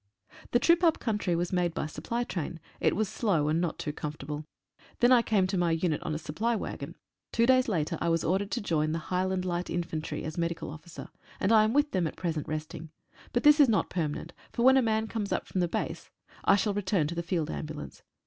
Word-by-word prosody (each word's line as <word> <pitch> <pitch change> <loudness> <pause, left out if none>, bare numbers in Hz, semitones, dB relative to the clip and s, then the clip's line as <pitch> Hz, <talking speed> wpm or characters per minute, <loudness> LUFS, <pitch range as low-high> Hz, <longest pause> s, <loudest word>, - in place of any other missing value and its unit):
The - - +4
trip 340 +7 +4
up 330 -2 +5
country 205 -6 -1
was 175 +2 -1
made 175 -2 +1
by - - -1
supply 235 +10 -3
train; 175 -7 -4 0.2
it - - +2
was 215 +2 +1
slow, 175 -9 +1
and 160 +2 +2
not 175 -3 -2
too 150 - -4
comfortable. 150 0 -5 0.5
Then 240 +1 +5
I 250 -2 +7
came 210 -5 +2
to 185 0 -1
my 175 -1 +2
unit 165 -1 0
on 155 - -3
a - - -1
supply 215 +10 -1
waggon. - - -5 0.4
Two 230 - +3
days 255 0 +4
later 165 -9 -1
I 170 - +1
was 165 -1 +1
ordered 195 +3 0
to 200 - -2
join 155 -5 0
the - - 0 0.2
Highland 185 0 0
Light 175 0 -2
Infantry, 165 -2 -3
as 155 +2 -4
Medical 170 -3 -2
Officer, 160 +2 -10 0.3
and 195 - +1
I 220 -1 +7
am 220 - 0
with 290 +1 +3
them 180 -4 +1
at - - -7
present 160 -4 -2
resting; 155 +1 -5 0.4
but 240 - 0
this 295 +1 +7
is 285 -4 +7
not 215 - +1
permanent, 165 -1 -3 0.2
for 235 - -1
when 260 +1 +7
a 265 - +5
man 220 -2 +1
comes 220 -2 -4
up - - -1
from 185 - -2
the 175 - +2
base - - -4 0.4
I 195 - +6
shall 205 +1 +1
return 190 -4 +1
to 155 - -3
the 170 - -2
Field 170 -2 -1
Ambulance. 155 -1 -6
180 Hz, 230 wpm, -29 LUFS, 160-220 Hz, 0.5 s, I